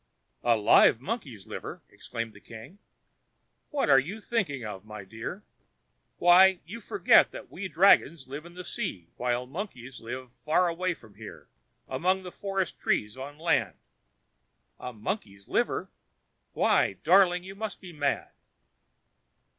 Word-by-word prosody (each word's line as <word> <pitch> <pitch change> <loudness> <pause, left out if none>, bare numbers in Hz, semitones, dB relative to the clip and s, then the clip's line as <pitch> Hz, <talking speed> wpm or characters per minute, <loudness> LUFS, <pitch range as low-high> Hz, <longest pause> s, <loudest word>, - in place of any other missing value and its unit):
"A 120 -1 +4
live 110 +1 +6
monkey's 135 - -5
liver!" - - -7
exclaimed 115 -2 -6
the 100 - -14
king. 115 - -12 0.9
"What 290 -2 0
are 135 - +7
you 185 +12 -5
thinking 180 - -2
of, 100 -3 -7
my 105 -1 -9
dear? 115 - -7 0.7
Why! 185 +1 +6
you 225 +7 -8
forget 405 - +5
that - - -10
we 190 - -5
dragons 170 -5 +4
live 140 +3 -7
in 175 - -15
the 180 - -7
sea, 135 - -4
while 125 0 -1
monkeys 135 - -7
live 125 +2 -7
far 160 +7 +1
away 175 +1 -1
from 110 -7 -18
here, - - -11 0.4
among 185 +8 0
the 180 - -8
forest 195 -1 -3
trees 105 +2 0
on 140 +3 -8
land. 165 +2 +1 1.0
A 125 - -6
monkey's 105 - -5
liver! - - -1 0.6
Why! - - +3
darling, 180 +1 +5
you 190 +1 -8
must 210 +1 -5
be 180 -2 -11
mad." 145 -2 -1
155 Hz, 140 wpm, -28 LUFS, 120-190 Hz, 1.0 s, are